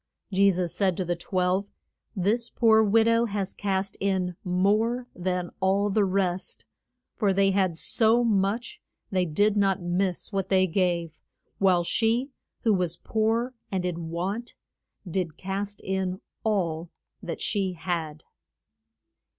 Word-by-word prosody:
Je 200 +1 +5
sus 180 -2 -1
said 190 -4 +1
to 185 - -1
the 175 0 0
twelve, 185 +3 0 0.5
This 215 +5 0
poor 220 -2 +4
wid 220 +2 +4
ow 230 +1 +4
has 200 -3 -3
cast 195 -1 -2
in 190 -2 0
more 215 +7 +1
than 180 -1 -2
all 195 +2 +2
the 210 +1 +3
rest. 185 -1 -1 0.5
For 205 -3 +2
they 195 0 +3
had 190 -4 +1
so 230 +6 +3
much 215 +1 0 0.3
they 185 -2 +2
did 205 +6 +2
not 195 -2 +2
miss 180 +2 -1
what 195 -1 -1
they 185 -1 +4
gave; 170 -3 -1 0.4
while 185 -3 +4
she, 230 +9 +1 0.3
who 225 -3 +3
was 180 -3 0
poor 225 +5 0 0.2
and 185 -2 -1
in 170 -2 -3
want, 195 +8 -3 0.5
did 170 -3 -2
cast 195 +2 -4
in 190 -1 -2 0.2
all 175 -6 0 0.3
that - - -5
she 195 -3 0
had. 165 -3 -4
190 Hz, 140 wpm, -26 LUFS, 180-205 Hz, 0.5 s, Je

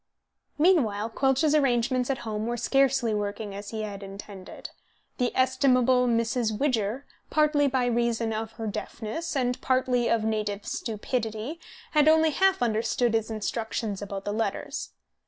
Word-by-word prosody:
Meanwhile 235 - +2
Quelch's 270 +5 +2
arrangements 255 -3 +2
at 270 - 0
home 215 0 -3
were 240 0 -2
scarcely 270 -2 +2
working 205 0 -3
as 200 +1 -7
he 220 -1 -4
had 205 -2 -6
intended. 195 -1 -9 0.5
The 250 -1 +1
estimable 255 -1 +3
Mrs. 230 -1 0
Widger, 255 -2 0 0.2
partly 300 -2 +3
by 260 -2 +1
reason 235 -1 0
of 220 +1 -4
her 225 - -6
deafness 220 +9 -4
and 250 -2 0
partly 255 -2 +1
of 230 -2 +2
native 210 -2 -2
stupidity, 225 +5 -3 0.3
had 300 -2 +4
only 320 0 +5
half 380 -2 +2
understood 230 +1 +1
his 225 0 0
instructions 220 -1 -3
about 200 -1 -6
the 205 - -2
letters. 225 +1 -3
235 Hz, 140 wpm, -27 LUFS, 215-265 Hz, 0.5 s, only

